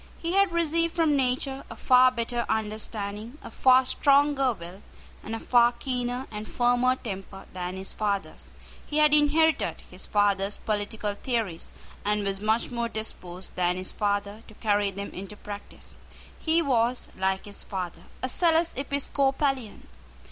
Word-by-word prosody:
He 335 +1 -3
had 395 -1 +4
received 335 0 +1
from 320 -3 +3
nature 265 +1 0
a - - -7
far 255 0 +6
better 235 -1 -2
understanding, 215 +2 -3
a - - -9
far 260 0 +5
stronger 280 0 +3
will, 180 -1 -9 0.4
and 225 - -5
a - - -4
far 240 0 +4
keener 250 0 -3
and 210 0 -6
firmer 245 +1 +3
temper 195 -4 -7
than 180 0 -4
his 190 0 -3
father's. 200 -2 -2 0.4
He 295 - -4
had 300 -1 +5
inherited 305 +2 +3
his - - -7
father's 205 -1 +2
political 210 0 -2
theories, 210 -6 -3 0.3
and 210 0 +1
was 195 -1 -1
much 220 +3 +1
more 235 -1 -1
disposed 185 -5 -6
than 180 0 +1
his 185 0 -5
father 205 +1 -1
to 215 - -14
carry 205 -2 +1
them 200 +1 -6
into 195 +3 -8
practice. 205 0 -9 0.4
He 330 +1 +1
was, 245 -3 +1
like 190 0 0
his 205 -1 -8
father, 180 -3 -5 0.2
a - - +1
zealous 330 +2 +2
Episcopalian. 275 -2 -1
230 Hz, 150 wpm, -27 LUFS, 200-270 Hz, 0.4 s, far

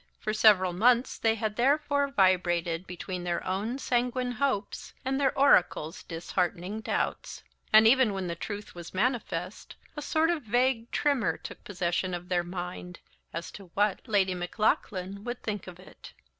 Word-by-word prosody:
For 215 - -2
several 200 -4 +5
months 240 +6 +3
they 225 -1 +2
had 215 -1 -3
therefore 285 +2 +2
vibrated 180 -5 +1
between 180 0 -5
their 175 -1 -2
own 205 +7 -2
sanguine 250 -1 0
hopes 245 -5 -2
and 270 +1 0
their 270 - +1
oracle's 180 - +3
disheartening 175 +3 -3
doubts; - - -3 0.3
and 215 +1 +8
even 255 -2 +5
when 190 -1 -3
the 170 - -2
truth 205 +4 -6
was 175 +1 -10
manifest, 205 -5 -2 0.2
a 295 - -5
sort 315 +3 +2
of 335 -3 -1
vague 240 0 +1
tremor 280 -7 +1
took - - -10
possession 180 -1 -1
of 175 +1 -8
their 175 -1 +1
mind, 180 0 -6 0.3
as 165 +1 -6
to 200 - -11
what 205 -1 +2
Lady 195 -4 +2
Maclaughlan 190 +1 -1
would 240 +1 -5
think 205 -3 -4
of 180 -1 -10
it. 185 - -14
205 Hz, 155 wpm, -28 LUFS, 180-245 Hz, 0.3 s, and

